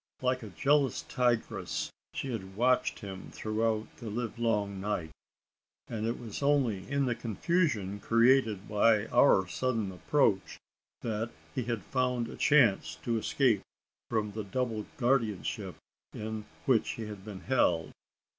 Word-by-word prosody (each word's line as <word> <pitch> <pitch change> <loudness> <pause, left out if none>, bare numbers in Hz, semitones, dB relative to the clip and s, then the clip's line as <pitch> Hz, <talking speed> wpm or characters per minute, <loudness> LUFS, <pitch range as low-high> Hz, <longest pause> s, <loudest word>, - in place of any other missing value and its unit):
Like 125 0 +1
a 110 - -7
jealous 140 +3 +2
tigress 120 -2 -1 0.2
had - - -11
she 130 -3 -2
watched 115 +7 0
him 95 -2 -7
throughout 110 0 -1
the 115 - -6
live 115 +1 -4
long 105 -4 0
night; 95 -6 -2 0.8
and 110 -1 -3
it 115 - -1
was 115 0 -7
only 135 -9 +1
in 140 0 +1
the 125 - +1
confusion, 115 - 0
created 115 -3 +3
by 105 0 +4
our 120 -7 +5
sudden 115 -2 -1
approach, 95 - +1 0.4
that 110 0 -2 0.2
he 125 - -2
had 115 -3 -2
found 125 -2 0
a - - -7
chance 100 - +4
of 115 - +1
escape 115 -1 +2 0.5
from 110 -2 0
the 110 +1 -4
double 110 +1 -2
guardianship 120 -6 0 0.4
in 110 0 -4 0.2
which 125 -5 +3
he 115 - -6
had 105 -2 -8
been 100 -3 -8
held. 85 - +2
115 Hz, 140 wpm, -31 LUFS, 105-125 Hz, 0.8 s, our